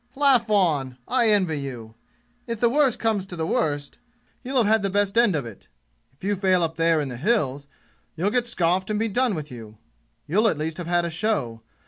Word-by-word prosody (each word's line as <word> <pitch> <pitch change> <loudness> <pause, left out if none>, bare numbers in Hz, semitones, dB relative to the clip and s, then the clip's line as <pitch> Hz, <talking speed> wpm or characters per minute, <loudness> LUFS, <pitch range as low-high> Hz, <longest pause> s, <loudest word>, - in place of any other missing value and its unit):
"Laugh 265 -5 +3
on! 150 -11 +1
I 230 - +2
envy 185 -8 +2
you! 120 -5 -7 0.5
If 230 -2 -4
the 235 0 +3
worst 275 -3 +2
comes 220 -4 0
to 180 - -8
the 160 -1 -2
worst, 145 -3 -2 0.4
you'll 265 +1 -2
have 240 - +4
had 220 +1 +3
the 195 - -1
best 205 +1 0
end 230 -6 +4
of 140 -5 -2
it. 115 -4 -12 0.5
If 135 - -29
you 205 +1 0
fail 185 -2 +2
up 165 0 -2
there 165 -1 +2
in 145 - -2
the 125 - -7
'Hills' 145 - 0 0.5
you'll 185 +6 0
get 245 +1 0
scoughed 185 -2 0
and 210 - 0
be 225 +2 0
done 240 0 0
with 150 -2 -6
you. 110 -3 -10 0.5
You'll 210 +9 +2
at 180 - +1
least 155 +1 -3
have 175 -2 -6
had 175 0 +1
a 170 - -3
show. 160 - -1
180 Hz, 215 wpm, -24 LUFS, 150-220 Hz, 0.5 s, have